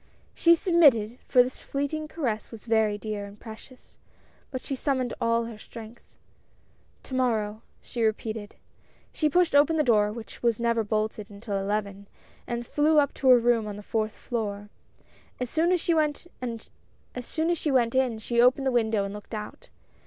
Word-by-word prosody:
She 335 Hz, 0 st, +5 dB
submitted, 275 Hz, -, +4 dB
for 250 Hz, -, +6 dB
this 255 Hz, +1 st, -6 dB
fleeting 285 Hz, +2 st, -3 dB
caress 250 Hz, -10 st, -3 dB
was 225 Hz, -2 st, -11 dB
very 220 Hz, -2 st, +2 dB
dear 210 Hz, -1 st, -4 dB
and 200 Hz, +1 st, -12 dB
precious, 235 Hz, +3 st, -13 dB, 0.5 s
but 255 Hz, -2 st, -5 dB
she -, -, -4 dB
summoned 260 Hz, -2 st, -1 dB
all 230 Hz, 0 st, +2 dB
her 225 Hz, -2 st, -9 dB
strength. 225 Hz, +1 st, -11 dB, 0.5 s
" -, -, -37 dB
To -, -, -10 dB
morrow! 220 Hz, -4 st, 0 dB
" -, -, -37 dB
she 240 Hz, -, -5 dB
repeated. 220 Hz, -1 st, -2 dB, 0.6 s
She 305 Hz, -, +1 dB
pushed 350 Hz, -1 st, +2 dB
open 295 Hz, +3 st, +5 dB
the 305 Hz, -, +3 dB
door, 210 Hz, -5 st, +3 dB
which 225 Hz, 0 st, -9 dB
was 235 Hz, -2 st, +1 dB
never 235 Hz, -1 st, +1 dB
bolted 215 Hz, -1 st, -2 dB
until 205 Hz, -1 st, -4 dB
eleven, 200 Hz, 0 st, -3 dB, 0.4 s
and 240 Hz, 0 st, -3 dB
flew 300 Hz, +5 st, +2 dB
up 285 Hz, -1 st, +3 dB
to 265 Hz, -, +1 dB
her 250 Hz, -, +9 dB
room 235 Hz, -2 st, +2 dB
on 205 Hz, -, -5 dB
the 205 Hz, -, -9 dB
fourth 215 Hz, 0 st, -1 dB
floor. 205 Hz, -3 st, -4 dB, 0.7 s
As 250 Hz, -2 st, -3 dB
soon 330 Hz, +3 st, +2 dB
as 365 Hz, -, +3 dB
she 340 Hz, -, +1 dB
went 305 Hz, 0 st, 0 dB, 0.2 s
in 255 Hz, +1 st, -2 dB
she 235 Hz, +2 st, +1 dB
opened 255 Hz, +3 st, +4 dB
the 265 Hz, -, +2 dB
window 220 Hz, -4 st, +1 dB
and 200 Hz, 0 st, -5 dB
looked 210 Hz, +2 st, -8 dB
out. 210 Hz, 0 st, -8 dB
235 Hz, 170 wpm, -27 LUFS, 215-270 Hz, 0.7 s, her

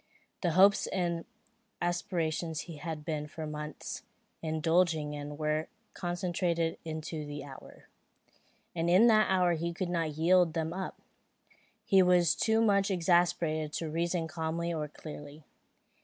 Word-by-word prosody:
The 175 Hz, -3 st, +1 dB
hopes 195 Hz, +3 st, +5 dB
and 170 Hz, -3 st, -1 dB, 0.5 s
aspirations 170 Hz, -2 st, -1 dB
he 165 Hz, -3 st, -9 dB
had 155 Hz, 0 st, -6 dB
been 150 Hz, -2 st, -3 dB
for 155 Hz, +1 st, -6 dB
months 150 Hz, -1 st, -6 dB, 0.4 s
indulging 160 Hz, -1 st, +1 dB
in 145 Hz, 0 st, -6 dB
were 155 Hz, +1 st, 0 dB, 0.3 s
concentrated 175 Hz, -2 st, -1 dB
into 160 Hz, -1 st, -5 dB
the 145 Hz, -1 st, -6 dB
hour; 135 Hz, -2 st, -12 dB, 0.9 s
and 170 Hz, 0 st, 0 dB
in 185 Hz, +6 st, +6 dB
that 215 Hz, -1 st, +5 dB
hour 180 Hz, -2 st, +3 dB
he 170 Hz, +1 st, -2 dB
could 185 Hz, 0 st, -2 dB
not 165 Hz, -4 st, -1 dB
yield 175 Hz, 0 st, +4 dB
them 160 Hz, 0 st, -1 dB
up. 190 Hz, 0 st, -5 dB, 0.9 s
He 195 Hz, -2 st, +5 dB
was 180 Hz, -3 st, +4 dB
too 220 Hz, 0 st, +2 dB
much 200 Hz, -2 st, +3 dB
exasperated 170 Hz, -4 st, +1 dB
to 160 Hz, -2 st, -3 dB
reason 170 Hz, +1 st, -1 dB
calmly 165 Hz, +1 st, -2 dB
or 155 Hz, -2 st, -2 dB
clearly. 150 Hz, 0 st, -10 dB
165 Hz, 135 wpm, -31 LUFS, 155-175 Hz, 0.9 s, in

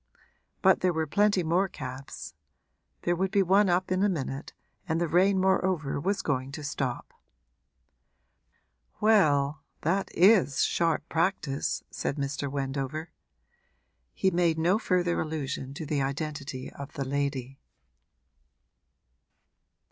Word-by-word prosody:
But -, -, +5 dB
there 180 Hz, -1 st, +2 dB
were 160 Hz, -1 st, 0 dB
plenty 200 Hz, +3 st, +2 dB
more 175 Hz, +4 st, +2 dB
cabs; 130 Hz, -, -8 dB, 0.7 s
there 175 Hz, -, +1 dB
would 190 Hz, +2 st, 0 dB
be 200 Hz, 0 st, +3 dB
one 195 Hz, +2 st, +4 dB
up 180 Hz, +1 st, +1 dB
in 185 Hz, 0 st, +1 dB
a 205 Hz, -, +4 dB
minute 140 Hz, -4 st, -4 dB, 0.4 s
and 160 Hz, +1 st, +1 dB
the 170 Hz, -, +1 dB
rain 190 Hz, +4 st, +3 dB
moreover 185 Hz, -6 st, +1 dB
was 195 Hz, +6 st, -1 dB
going 130 Hz, -2 st, -1 dB
to 150 Hz, -, -6 dB
stop. 135 Hz, -3 st, -3 dB, 1.9 s
'Well, 150 Hz, -10 st, +3 dB, 0.2 s
that 190 Hz, +5 st, 0 dB
is 185 Hz, -6 st, +5 dB
sharp 165 Hz, -1 st, +1 dB
practice!' 160 Hz, -5 st, -1 dB
said -, -, -2 dB
Mr. 140 Hz, 0 st, -3 dB
Wendover. 140 Hz, +3 st, -3 dB, 1.0 s
He 190 Hz, -, +2 dB
made 170 Hz, -2 st, +2 dB
no 175 Hz, +6 st, +2 dB
further 180 Hz, -5 st, +1 dB
allusion 145 Hz, -4 st, -4 dB
to 160 Hz, -1 st, -5 dB
the 145 Hz, -2 st, -1 dB
identity 140 Hz, -1 st, -4 dB
of 140 Hz, +1 st, -9 dB
the 140 Hz, -3 st, -3 dB
lady. 135 Hz, -1 st, -2 dB
160 Hz, 125 wpm, -28 LUFS, 140-185 Hz, 1.9 s, But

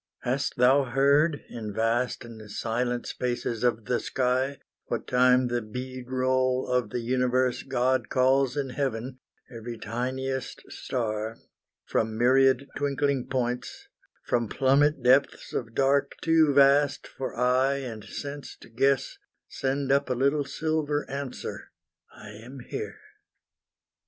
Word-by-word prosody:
Hast 135 Hz, +3 st, -1 dB
thou 130 Hz, +3 st, +5 dB
heard, 140 Hz, +4 st, +3 dB
In 110 Hz, -3 st, -6 dB
vast 115 Hz, +3 st, 0 dB
and 110 Hz, -2 st, -11 dB
silent 120 Hz, +3 st, -2 dB
spaces 120 Hz, -2 st, -3 dB
of 115 Hz, -3 st, +1 dB
the 125 Hz, -, 0 dB
sky, 130 Hz, +2 st, 0 dB, 0.3 s
What -, -, -3 dB
time 125 Hz, 0 st, +4 dB
the 120 Hz, 0 st, -1 dB
bead 125 Hz, +3 st, -7 dB
roll 130 Hz, 0 st, +1 dB
of 125 Hz, -3 st, 0 dB
the 120 Hz, -, -3 dB
universe 125 Hz, +1 st, +1 dB
God 130 Hz, 0 st, 0 dB
calls 130 Hz, +1 st, +2 dB
in 135 Hz, -2 st, -2 dB
heaven, 130 Hz, -1 st, -3 dB, 0.4 s
every 115 Hz, +1 st, -6 dB
tiniest 130 Hz, +4 st, -4 dB
star 110 Hz, -2 st, -3 dB, 0.5 s
From 110 Hz, 0 st, -1 dB
myriad 130 Hz, +2 st, +4 dB
twinkling 140 Hz, -2 st, 0 dB
points 125 Hz, -1 st, -3 dB, 0.4 s
from 120 Hz, -3 st, 0 dB
plummet 140 Hz, +1 st, +2 dB
depths 130 Hz, +3 st, +3 dB
Of 115 Hz, -2 st, -4 dB
dark 140 Hz, +1 st, +2 dB
too 160 Hz, -2 st, +4 dB
vast 140 Hz, +1 st, +4 dB
for 130 Hz, -, -6 dB
eye 125 Hz, +3 st, +2 dB
and 120 Hz, -6 st, -6 dB
sense 145 Hz, -1 st, -7 dB
to -, -, -14 dB
guess, 135 Hz, +3 st, +1 dB, 0.3 s
Send 135 Hz, 0 st, -1 dB
up 140 Hz, 0 st, +2 dB
a 125 Hz, -, +1 dB
little 140 Hz, +3 st, +1 dB
silver 150 Hz, +1 st, -1 dB
answer 140 Hz, -2 st, -6 dB, 0.4 s
"I 105 Hz, -, -12 dB
am 120 Hz, +5 st, -10 dB
here." 435 Hz, 0 st, -5 dB
130 Hz, 130 wpm, -27 LUFS, 120-140 Hz, 0.5 s, thou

